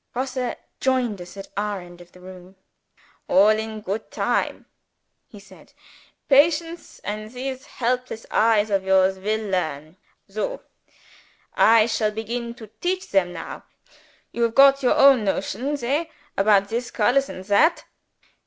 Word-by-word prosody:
_" -, -, -53 dB
Grosse 255 Hz, -1 st, -3 dB, 0.2 s
joined 250 Hz, -7 st, 0 dB
us 175 Hz, +2 st, -11 dB
at 195 Hz, -, -9 dB
our 205 Hz, 0 st, -2 dB
end 175 Hz, -1 st, -13 dB
of 175 Hz, -, -16 dB
the 180 Hz, -, -17 dB
room. 185 Hz, 0 st, -13 dB, 0.7 s
"All 195 Hz, +3 st, +5 dB
in 220 Hz, 0 st, -1 dB
goot 205 Hz, +2 st, -4 dB
time," -, -, -1 dB, 0.6 s
he 210 Hz, -, -13 dB
said. 195 Hz, 0 st, -18 dB, 0.5 s
"Patience 330 Hz, +4 st, +2 dB
and 215 Hz, +1 st, -5 dB
these 260 Hz, +1 st, -6 dB
helpless 245 Hz, -2 st, -3 dB
eyes 215 Hz, -1 st, +3 dB
of 195 Hz, -1 st, +1 dB
yours 190 Hz, 0 st, +3 dB
will 215 Hz, +3 st, -2 dB
learn. 155 Hz, -2 st, -3 dB, 0.3 s
Soh! 210 Hz, +1 st, -4 dB, 0.9 s
I 225 Hz, -1 st, +5 dB
shall 225 Hz, -2 st, 0 dB
begin 235 Hz, +2 st, -5 dB
to 220 Hz, -3 st, -13 dB
teach 370 Hz, +2 st, -2 dB
them 190 Hz, -3 st, +2 dB
now. 165 Hz, -, -8 dB, 0.7 s
You 235 Hz, -, -5 dB
have 230 Hz, -1 st, +1 dB
got 275 Hz, 0 st, +6 dB
your 250 Hz, -, +2 dB
own 275 Hz, -5 st, +6 dB
notions 250 Hz, +8 st, -2 dB
hey? 290 Hz, +7 st, -1 dB, 0.3 s
about 200 Hz, 0 st, +3 dB
this 240 Hz, +2 st, -3 dB
colors 255 Hz, +5 st, +1 dB
and 185 Hz, -, -8 dB
that? 205 Hz, -, +3 dB
220 Hz, 145 wpm, -23 LUFS, 195-255 Hz, 0.9 s, got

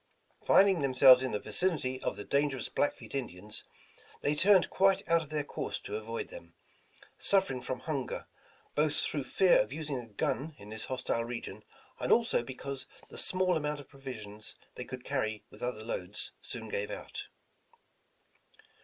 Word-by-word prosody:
Finding 190 Hz, -4 st, +6 dB
themselves 130 Hz, -1 st, +8 dB
in 130 Hz, -, 0 dB
the -, -, +1 dB
vicinity 130 Hz, -, 0 dB
of -, -, -1 dB
the 105 Hz, -, -6 dB
dangerous 140 Hz, -1 st, 0 dB
Blackfeet 145 Hz, -, -1 dB
Indians, 105 Hz, -5 st, -5 dB, 0.6 s
they 145 Hz, -, +2 dB
turned 190 Hz, +5 st, +5 dB
quite 195 Hz, 0 st, +3 dB
out 165 Hz, 0 st, +4 dB
of 155 Hz, -, -9 dB
their 150 Hz, -1 st, -1 dB
course -, -, -4 dB
to -, -, -5 dB
avoid 445 Hz, 0 st, -4 dB
them, -, -, -11 dB, 0.6 s
suffering 190 Hz, -10 st, +2 dB
from 125 Hz, 0 st, -4 dB
hunger, 140 Hz, -5 st, -3 dB, 0.5 s
both 150 Hz, 0 st, +2 dB
through 145 Hz, -3 st, -1 dB
fear 185 Hz, +7 st, +5 dB
of 105 Hz, +2 st, -3 dB
using 150 Hz, -2 st, -3 dB
a 120 Hz, -, -8 dB
gun 135 Hz, +8 st, -2 dB
in 105 Hz, +1 st, -11 dB
this 110 Hz, 0 st, -5 dB
hostile 125 Hz, -2 st, -1 dB
region, 120 Hz, 0 st, -6 dB, 0.4 s
and -, -, 0 dB
also 230 Hz, -, +4 dB
because 135 Hz, +2 st, -6 dB, 0.2 s
the -, -, -10 dB
small 185 Hz, -1 st, +2 dB
amount 150 Hz, -1 st, -1 dB
of 145 Hz, -, -12 dB
provisions 110 Hz, -7 st, -8 dB, 0.2 s
they 125 Hz, -, -6 dB
could 130 Hz, 0 st, -7 dB
carry 110 Hz, -6 st, -1 dB
with -, -, -14 dB
other 120 Hz, -3 st, -2 dB
loads, 105 Hz, -2 st, -3 dB
soon 115 Hz, -3 st, -6 dB
gave 105 Hz, -1 st, -2 dB
out. -, -, -6 dB
135 Hz, 160 wpm, -32 LUFS, 120-155 Hz, 0.6 s, themselves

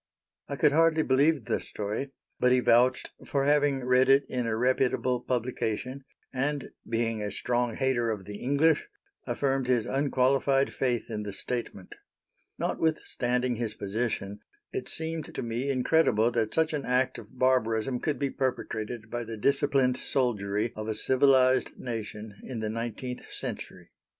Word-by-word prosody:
I 140 Hz, -, -4 dB
could 140 Hz, -, +4 dB
hardly 160 Hz, +1 st, +4 dB
believe 140 Hz, -1 st, +3 dB
the -, -, 0 dB
story, 105 Hz, +7 st, -4 dB, 0.3 s
but 125 Hz, -, +4 dB
he 125 Hz, -, +5 dB
vouched 125 Hz, +1 st, +3 dB
for 140 Hz, -1 st, 0 dB
having 145 Hz, -3 st, +2 dB
read 125 Hz, +1 st, +4 dB
it 135 Hz, +1 st, +5 dB
in 125 Hz, -2 st, -2 dB
a 110 Hz, -1 st, 0 dB
reputable 125 Hz, 0 st, +1 dB
publication, 125 Hz, +1 st, -2 dB, 0.3 s
and 140 Hz, +2 st, -2 dB, 0.2 s
being 115 Hz, -1 st, 0 dB
a 105 Hz, -, -2 dB
strong 120 Hz, +1 st, -1 dB
hater 130 Hz, -3 st, +1 dB
of 105 Hz, -4 st, -3 dB
the 105 Hz, +1 st, -7 dB
English, 145 Hz, +4 st, +2 dB, 0.4 s
affirmed 135 Hz, -2 st, 0 dB
his 125 Hz, -3 st, +2 dB
unqualified 135 Hz, 0 st, +2 dB
faith 120 Hz, -3 st, -1 dB
in 105 Hz, -1 st, -3 dB
the 105 Hz, -1 st, -5 dB
statement. 100 Hz, -2 st, -5 dB, 0.6 s
Notwithstanding 125 Hz, -6 st, 0 dB
his 115 Hz, -2 st, -3 dB
position, 105 Hz, -1 st, -3 dB, 0.3 s
it 395 Hz, -, -4 dB
seemed 160 Hz, -1 st, -4 dB
to -, -, -2 dB
me 120 Hz, +4 st, -2 dB
incredible 125 Hz, -4 st, +3 dB
that 115 Hz, -2 st, 0 dB
such 160 Hz, 0 st, +1 dB
an 145 Hz, -2 st, -2 dB
act 125 Hz, +1 st, +1 dB
of 130 Hz, -, -14 dB
barbarism 125 Hz, -1 st, +2 dB
could 150 Hz, +2 st, -1 dB
be 140 Hz, -1 st, -1 dB
perpetrated 115 Hz, -3 st, -3 dB
by 120 Hz, 0 st, -2 dB
the 115 Hz, -1 st, -7 dB
disciplined 135 Hz, +1 st, +2 dB
soldiery 110 Hz, -5 st, -1 dB
of 110 Hz, 0 st, -5 dB
a 110 Hz, -, -1 dB
civilized 130 Hz, +2 st, +3 dB
nation 110 Hz, -3 st, -6 dB
in 125 Hz, -3 st, -6 dB
the 110 Hz, -1 st, -2 dB
nineteenth 120 Hz, +2 st, -5 dB
century. -, -, -7 dB
125 Hz, 150 wpm, -28 LUFS, 115-135 Hz, 0.6 s, he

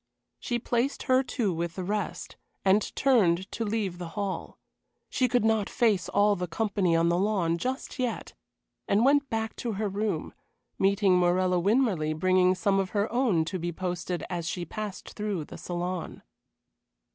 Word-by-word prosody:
She 240 Hz, -, -1 dB
placed 240 Hz, +3 st, -1 dB
her 255 Hz, 0 st, +4 dB
two 235 Hz, -7 st, -1 dB
with 170 Hz, 0 st, -3 dB
the 185 Hz, -, -4 dB
rest, 205 Hz, +3 st, -3 dB, 0.3 s
and 195 Hz, +2 st, +5 dB
turned 190 Hz, -9 st, +3 dB
to 230 Hz, -, -3 dB
leave 205 Hz, -5 st, -2 dB
the 175 Hz, -, -5 dB
hall. 200 Hz, -2 st, -3 dB, 0.5 s
She 255 Hz, -, +2 dB
could 245 Hz, -2 st, +1 dB
not 220 Hz, -2 st, +2 dB
face 210 Hz, -7 st, +1 dB
all 205 Hz, 0 st, +3 dB
the 180 Hz, -1 st, -3 dB
company 195 Hz, -1 st, 0 dB
on 165 Hz, +1 st, +3 dB
the 175 Hz, +1 st, +2 dB
lawn 185 Hz, -5 st, +1 dB
just 260 Hz, +5 st, -4 dB
yet, 250 Hz, -2 st, -2 dB, 0.5 s
and 210 Hz, +4 st, +3 dB
went 285 Hz, 0 st, +3 dB
back 220 Hz, 0 st, -2 dB
to 235 Hz, -2 st, -3 dB
her 210 Hz, +1 st, -1 dB
room, 200 Hz, -4 st, -2 dB, 0.5 s
meeting 195 Hz, -1 st, +3 dB
Morella 180 Hz, 0 st, +2 dB
Winmarleigh 190 Hz, -7 st, +1 dB
bringing 185 Hz, +2 st, +3 dB
some 195 Hz, +1 st, +1 dB
of 190 Hz, -1 st, -1 dB
her 205 Hz, +2 st, 0 dB
own 225 Hz, -11 st, +2 dB
to 185 Hz, +3 st, -4 dB
be 175 Hz, +1 st, -2 dB
posted 175 Hz, 0 st, -3 dB
as 170 Hz, -2 st, -4 dB
she 175 Hz, 0 st, -3 dB
passed 210 Hz, +2 st, -6 dB
through 205 Hz, -7 st, -3 dB
the -, -, -10 dB
saloon. 175 Hz, 0 st, -4 dB
195 Hz, 170 wpm, -28 LUFS, 175-220 Hz, 0.5 s, and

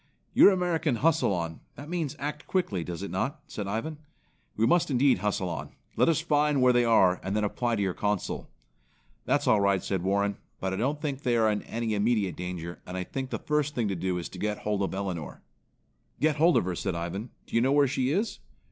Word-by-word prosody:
"Your -, -, +8 dB
American 170 Hz, -7 st, +1 dB
hustle 150 Hz, -1 st, +2 dB
on; 85 Hz, -3 st, -3 dB, 0.2 s
that 145 Hz, -, -9 dB
means 165 Hz, -5 st, -2 dB
act 150 Hz, +2 st, -5 dB
quickly, 110 Hz, -, 0 dB
does 90 Hz, +2 st, -5 dB
it 100 Hz, -, -5 dB
not?" 130 Hz, -, -2 dB
said 105 Hz, -, -5 dB
Ivan. 145 Hz, +10 st, -3 dB, 0.6 s
"We 110 Hz, -, +2 dB
must 170 Hz, +7 st, +3 dB
indeed 130 Hz, -5 st, +3 dB
hustle 95 Hz, -2 st, -1 dB
on. 85 Hz, -, -5 dB, 0.2 s
Let -, -, +4 dB
us 160 Hz, -, +3 dB
find 150 Hz, -3 st, +2 dB
where 125 Hz, -1 st, +5 dB
they 120 Hz, 0 st, +4 dB
are, 95 Hz, -6 st, +4 dB
and 95 Hz, +2 st, -2 dB
then 105 Hz, -, +1 dB
apply 120 Hz, +3 st, 0 dB
to 100 Hz, -, 0 dB
your 95 Hz, -2 st, 0 dB
Consul." 105 Hz, 0 st, -2 dB, 0.8 s
"That's -, -, +1 dB
all 105 Hz, -, +4 dB
right," 100 Hz, -2 st, +2 dB
said 95 Hz, -3 st, -1 dB
Warren, 100 Hz, +2 st, 0 dB, 0.2 s
"but 95 Hz, 0 st, -2 dB
I -, -, -2 dB
don't 140 Hz, +7 st, 0 dB
think 145 Hz, -3 st, -3 dB
they 120 Hz, -3 st, +1 dB
are 110 Hz, -1 st, +4 dB
in 105 Hz, -, -1 dB
any 115 Hz, -1 st, -3 dB
immediate 105 Hz, -2 st, +1 dB
danger 90 Hz, -1 st, -6 dB
and 90 Hz, -, -5 dB
I 90 Hz, -, -1 dB
think 130 Hz, +7 st, -5 dB
the -, -, -2 dB
first 150 Hz, -1 st, -1 dB
thing 115 Hz, -3 st, 0 dB
to 95 Hz, -, -1 dB
do 90 Hz, +1 st, -1 dB
is 85 Hz, -, -4 dB
to 90 Hz, -, -10 dB
got 105 Hz, +1 st, -1 dB
hold 105 Hz, -1 st, -2 dB
of 95 Hz, -, -1 dB
Elinor." 95 Hz, -6 st, -5 dB, 0.8 s
"Get 155 Hz, -1 st, +2 dB
hold 165 Hz, +3 st, +5 dB
of -, -, +2 dB
her," 90 Hz, -, -1 dB
said 95 Hz, 0 st, -2 dB
Ivan. 90 Hz, +7 st, -4 dB, 0.2 s
"Do -, -, -7 dB
you 115 Hz, -, +4 dB
know 130 Hz, +3 st, +3 dB
where 145 Hz, 0 st, +5 dB
she 130 Hz, -1 st, 0 dB
is?" 200 Hz, +10 st, -1 dB
110 Hz, 230 wpm, -28 LUFS, 95-145 Hz, 0.8 s, Your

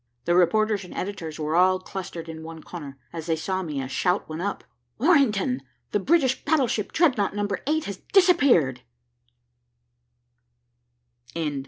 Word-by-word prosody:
The 175 Hz, -, +2 dB
reporters 210 Hz, +3 st, +3 dB
and 180 Hz, -, -11 dB
editors 170 Hz, -5 st, -5 dB
were 155 Hz, +1 st, -1 dB
all 185 Hz, +1 st, +5 dB
clustered 185 Hz, -3 st, -7 dB
in 160 Hz, -1 st, -7 dB
one 160 Hz, 0 st, -9 dB
corner. 145 Hz, -6 st, -8 dB, 0.2 s
As 165 Hz, -1 st, -6 dB
they 165 Hz, -, +2 dB
saw 185 Hz, +4 st, -2 dB
me, 150 Hz, -6 st, -4 dB
a 135 Hz, -, -3 dB
shout 180 Hz, +7 st, 0 dB
went 155 Hz, +1 st, -5 dB
up. 200 Hz, +1 st, -3 dB, 0.4 s
"Orrington, 220 Hz, -, +3 dB, 0.3 s
the 205 Hz, -, +1 dB
British 265 Hz, -, +2 dB
battleship 260 Hz, -9 st, +1 dB
Dreadnought, 250 Hz, -, +2 dB
Number 205 Hz, -2 st, -1 dB
8, 315 Hz, +1 st, +1 dB
has 200 Hz, -2 st, -5 dB
disappeared!" 280 Hz, -, +4 dB
190 Hz, 140 wpm, -25 LUFS, 165-230 Hz, 0.4 s, all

